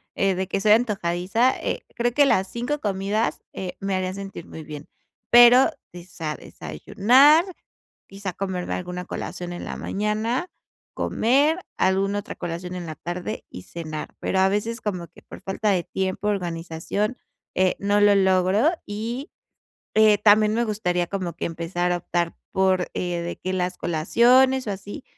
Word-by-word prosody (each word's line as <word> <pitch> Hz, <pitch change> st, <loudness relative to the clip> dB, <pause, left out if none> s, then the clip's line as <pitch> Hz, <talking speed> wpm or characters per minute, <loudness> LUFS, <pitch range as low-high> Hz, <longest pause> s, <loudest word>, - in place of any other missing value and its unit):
eh, 195 Hz, -1 st, +1 dB
de 190 Hz, +1 st, -2 dB
que 195 Hz, -, -1 dB
soy 210 Hz, +1 st, +4 dB
antojadiza, 210 Hz, +1 st, +2 dB
eh, -, -, -3 dB
creo 240 Hz, 0 st, +1 dB
que 285 Hz, +2 st, +5 dB
las 195 Hz, -8 st, +2 dB
5 245 Hz, +8 st, -3 dB
comidas, 205 Hz, 0 st, -1 dB
eh, 185 Hz, -2 st, -5 dB
me 195 Hz, 0 st, -1 dB
harían 185 Hz, 0 st, -2 dB
sentir 195 Hz, -3 st, -7 dB
muy 160 Hz, -, -9 dB
bien, 150 Hz, -1 st, -9 dB, 0.4 s
pero 240 Hz, +4 st, +8 dB, 0.2 s
desa 175 Hz, -3 st, -6 dB
desayunar, 275 Hz, -, +3 dB, 0.6 s
quizá 195 Hz, -1 st, -6 dB
comerme 185 Hz, -2 st, -3 dB
alguna 180 Hz, 0 st, -5 dB
colación 175 Hz, 0 st, -5 dB
en 175 Hz, -, -6 dB
la -, -, -5 dB
mañana, 215 Hz, -, -2 dB, 0.4 s
comer, 285 Hz, +8 st, +2 dB, 0.2 s
alguna 195 Hz, +2 st, +2 dB
otra -, -, -8 dB
colación 175 Hz, +2 st, -5 dB
en 180 Hz, -1 st, -5 dB
la 155 Hz, -, -6 dB
tarde 175 Hz, +7 st, -5 dB
y 90 Hz, -, -9 dB
cenar. 155 Hz, -, -7 dB
Pero 190 Hz, -, -1 dB
a 190 Hz, -, +5 dB
veces, 215 Hz, +4 st, -2 dB
como 180 Hz, -5 st, -4 dB
que 165 Hz, -, -19 dB
por -, -, -12 dB
falta 200 Hz, +2 st, -1 dB
de 185 Hz, -3 st, +2 dB
tiempo, 190 Hz, +2 st, -2 dB
organización, 180 Hz, +3 st, -2 dB, 0.4 s
eh, 185 Hz, 0 st, +2 dB
no 205 Hz, +1 st, +2 dB
lo 205 Hz, 0 st, +6 dB
logro 190 Hz, -, +3 dB, 0.2 s
y, 230 Hz, +7 st, -5 dB, 0.6 s
eh, 215 Hz, -1 st, +5 dB
también 210 Hz, +1 st, +5 dB
me 235 Hz, +1 st, +1 dB
gustaría 180 Hz, -5 st, -1 dB
como 185 Hz, -2 st, -3 dB
que -, -, -3 dB
empezar 170 Hz, +2 st, -2 dB
a -, -, +1 dB
optar 170 Hz, 0 st, -2 dB, 0.2 s
por 190 Hz, -1 st, +2 dB
eh, 175 Hz, -1 st, -2 dB
de 170 Hz, -, -5 dB
que 185 Hz, 0 st, -4 dB
las 180 Hz, 0 st, -2 dB
colaciones 245 Hz, +11 st, +3 dB
o -, -, -2 dB
así, 205 Hz, +7 st, -7 dB
195 Hz, 160 wpm, -24 LUFS, 180-215 Hz, 0.6 s, pero